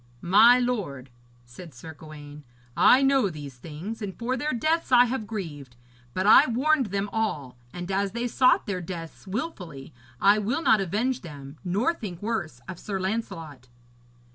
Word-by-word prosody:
'My 220 +7 +7
lord,' 185 - -3 0.3
said 130 +5 -12
Sir 160 +6 -10
Gawaine, 150 -1 -12 0.3
'I 265 +2 +6
know 270 -6 +3
these 145 -5 -9
things, 170 - -7
and 195 -3 -5
for 245 +2 -2
their 295 +4 -2
deaths 310 +6 0
I 245 0 +7
have 235 -3 -3
grieved, 150 - -7 0.4
but 185 - 0
I 245 +7 +7
warned 265 +2 +2
them 200 +1 -2
all, 150 - -2 0.2
and 175 +1 -6
as 195 +1 -1
they 235 +1 -2
sought 255 +2 +3
their 195 -5 -3
deaths 170 +1 -8
wilfully 190 - -6 0.3
I 205 +2 +5
will 230 +10 -1
not 215 - +4
avenge 225 +8 -1
them, 145 -4 -10
nor 205 - +1
think 195 - -7
worse 190 - -4
of 180 -1 -7
Sir 195 -3 -4
Lancelot.' 165 - -4
195 Hz, 165 wpm, -26 LUFS, 155-235 Hz, 0.4 s, My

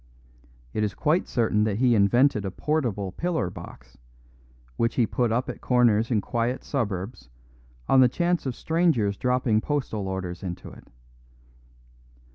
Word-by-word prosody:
It 110 - 0
is 105 -1 -2
quite 165 +3 +1
certain 110 -3 +1
that 105 -2 -1
he 125 0 +3
invented 110 +2 +3
a 95 - -2
portable 105 - -2
pillar 160 - -2
box, - - -12 0.8
which 115 +1 0
he 120 - +3
put 120 +1 0
up 120 +3 0
at - - -7
corners 115 -3 +3
in 110 -5 +1
quiet 120 +4 -2
suburbs 100 - -4 0.6
on 135 - +5
the 125 - +6
chance 175 +1 0
of 125 - -3
strangers 160 - +1
dropping 125 -2 +1
postal 120 -9 -2
orders 95 -2 -4
into 90 -1 -6
it. - - -15
115 Hz, 145 wpm, -25 LUFS, 100-130 Hz, 0.8 s, the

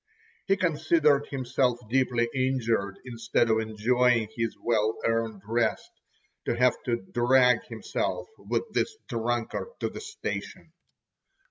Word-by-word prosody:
He 195 0 +3
considered 155 -4 +2
himself 130 -2 0
deeply 125 -1 +2
injured, 115 -7 0
instead 115 -1 0
of 110 - +3
enjoying 115 +1 +2
his 115 -1 -2
well 110 -2 +1
earned 115 -3 -1
rest, 115 +1 0 0.5
to 120 - -1
have 125 0 +5
to 120 -5 -1
drag 125 +1 +4
himself - - -3
with - - -1
this 435 - 0
drunkard 120 - -2
to - - -1
the - - -8
station. 445 +1 -6
120 Hz, 120 wpm, -27 LUFS, 115-130 Hz, 0.5 s, have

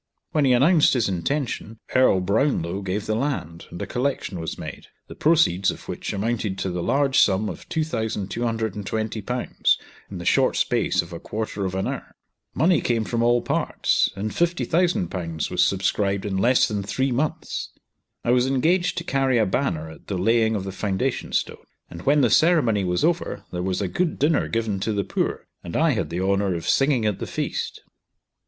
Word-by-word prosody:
When 150 -2 +2
he 130 - +4
announced 150 +4 +5
his 120 -4 +2
intention, 115 - -2 0.2
Earl 130 -7 +5
Brownlow 100 - 0
gave 100 +2 -3
the 110 - -1
land, 110 - -3
and 85 - -8
a - - -3
collection 125 -8 -2
was 80 - -4
made, - - -8 0.2
the - - -10
proceeds 150 - +3
of - - -6
which - - -4
amounted 105 -1 -2
to 95 - -2
the 90 0 -3
large 135 +7 +2
sum 100 +2 +3
of - - -8
Ł2,220, 110 -3 -1 0.3
in - - -7
the - - -7
short - - +3
space - - +1
of - - -12
a - - -6
quarter 105 -2 -4
of 95 0 -3
an 95 - -1
hour. - - -6 0.4
Money 165 +4 +3
came 115 -2 0
from 115 +2 -1
all 120 0 +3
parts, - - +1
and 105 +2 -3
Ł50,000 155 - 0
was - - +3
subscribed 100 +1 0
in 100 -2 -2
less 120 +6 +4
than 105 -2 -2
three 130 +7 -1
months. 140 +5 -2 0.6
I 120 - +3
was 125 +1 +3
engaged 170 +7 +1
to - - -2
carry 135 -2 +1
a 110 - +3
banner 90 - -1
at 80 - -15
the 100 - -2
laying 110 +3 +2
of 100 - -2
the 95 - -5
foundation 95 0 -2
stone; - - -1 0.3
and 85 - -8
when 145 +1 +5
the 120 -5 +3
ceremony 135 - +4
was 90 +4 0
over 170 +1 0
there 90 - -3
was 95 +2 -1
a - - 0
good 170 - -1
dinner 150 +2 +2
given 110 -4 -1
to 110 +3 -1
the 100 -1 0
poor, - - -2 0.2
and 85 - -4
I 160 0 +4
had 105 - -1
the 85 +2 -3
honour 100 -1 +1
of 85 - -5
singing 135 -5 +3
at 105 -3 0
the - - -4
feast. - - -3
110 Hz, 190 wpm, -24 LUFS, 95-135 Hz, 0.6 s, announced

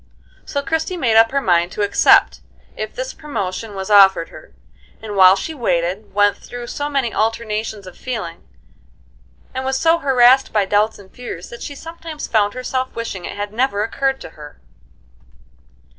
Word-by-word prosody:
So 280 - -3
Christie 320 +5 -2
made 235 -9 +1
up 225 0 +6
her 275 +2 0
mind 175 -4 +2
to 210 - -1
accept, 205 - +4 0.3
if - - -6
this - - -4
promotion 215 -7 -5
was 190 +1 -5
offered 195 -4 +6
her; - - -14 0.5
and 215 -2 -7
while 190 -1 +7
she 320 +11 -5
waited, 190 - -2
went 205 -1 +3
through 245 0 -9
so 290 +4 -4
many 270 -5 -1
alternations 220 -2 -2
of 185 - -11
feeling, 215 -10 -5 1.1
and 260 - -3
was 265 0 -1
so 330 +3 +3
harassed 265 -2 +4
by 210 -2 +2
doubts 210 +3 +1
and 195 -2 -16
fears 240 -8 -8
that 235 - -10
she 285 - -6
sometimes 325 0 -8
found 205 -1 +1
herself 255 +1 -3
wishing 215 -6 -5
it - - -7
had 205 0 -4
never 225 -3 0
occurred 270 +4 -1
to - - -8
her. 150 -2 -13
225 Hz, 170 wpm, -19 LUFS, 200-265 Hz, 1.1 s, while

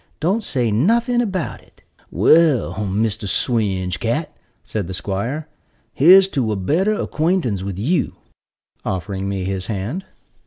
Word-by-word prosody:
Don't 195 +8 0
say 125 - 0
nothing 235 - +2
about 190 -8 -3
it." - - -26 0.3
"Well, 155 -7 +4
Mr. 105 +1 -1
Swinge 95 - 0
cat," - - -2 0.3
said 105 -5 -4
the 95 - -4
'squire, 105 - -3 0.5
"here's 185 +6 +7
to 125 - -1
a - - 0
better 160 - +1
acquaintance 160 - 0
with 95 -1 -5
you," 150 - 0 0.7
offering 95 +1 -3
me 95 -1 -2
his 95 0 -3
hand. 115 - -4
115 Hz, 130 wpm, -20 LUFS, -, 0.7 s, here's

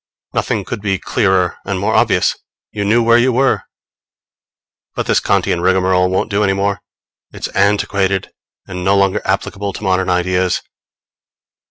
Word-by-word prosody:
Nothing - - -1
could - - -5
be 100 -2 0
clearer 95 -2 0
and 95 -1 -3
more 100 - 0
obvious! - - +2 0.4
You 105 - -3
knew 115 +4 +3
where 115 +1 +5
you 130 +2 +3
were. 130 +2 +1 1.3
But - - -2
this - - +2
Kantian 85 - 0
rigmarole 90 0 +2
won't 95 +2 -1
do 100 +1 +1
any 95 -1 +2
more: 100 -1 -1 0.5
it's - - -6
antiquated 100 -1 0 0.3
and 90 -1 -6
no 100 +2 +3
longer 100 -1 +2
applicable 100 0 -2
to - - -8
modern 95 -1 +1
ideas. 90 0 0
95 Hz, 150 wpm, -16 LUFS, 95-100 Hz, 1.3 s, where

